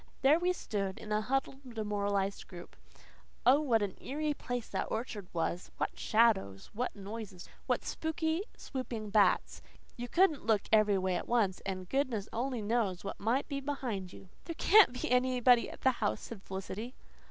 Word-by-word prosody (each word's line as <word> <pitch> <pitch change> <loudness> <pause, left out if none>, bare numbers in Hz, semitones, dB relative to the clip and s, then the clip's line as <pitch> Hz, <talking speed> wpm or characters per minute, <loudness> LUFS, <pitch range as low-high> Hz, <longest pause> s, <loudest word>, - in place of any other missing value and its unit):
There 290 +5 +6
we 355 +1 +2
stood 200 - -3
in 215 - -9
a 210 0 +2
huddled 265 +1 -3
demoralized 200 -2 -1
group. 175 -2 -11 0.7
Oh, 265 +4 +7
what 235 -8 +2
an 195 -2 -3
eerie 300 +2 -1
place 245 -4 -4
that - - -2
orchard 220 -4 -4
was! 170 +1 -2
What - - -3
shadows! 210 - +2
What 245 +4 -2
noises! 200 -2 -8 0.2
What - - 0
spooky 320 +1 -1 0.2
swooping 250 -5 -5
of 205 - -8
bats! 205 -3 +3 0.4
You 245 0 -4
COULDN'T 340 -1 +3
look 215 -3 +3
every 210 -2 +5
way 185 -1 0
at - - -6
once, 215 -6 +1
and 185 -1 -4
goodness 245 -5 -1
only 245 -1 -2
knew 215 -3 +1
what 200 - -5
might 235 +6 +1
be 280 -2 -3
behind 250 -10 -3
you! 190 - -13 0.2
"There 335 - -5
CAN'T 375 - +6
be - - -2
anybody 250 -1 +4
in - - -8
the 260 - +5
house," 110 - -1
said 225 -4 -8
Felicity. 195 +6 -6
225 Hz, 175 wpm, -32 LUFS, 200-260 Hz, 0.7 s, Oh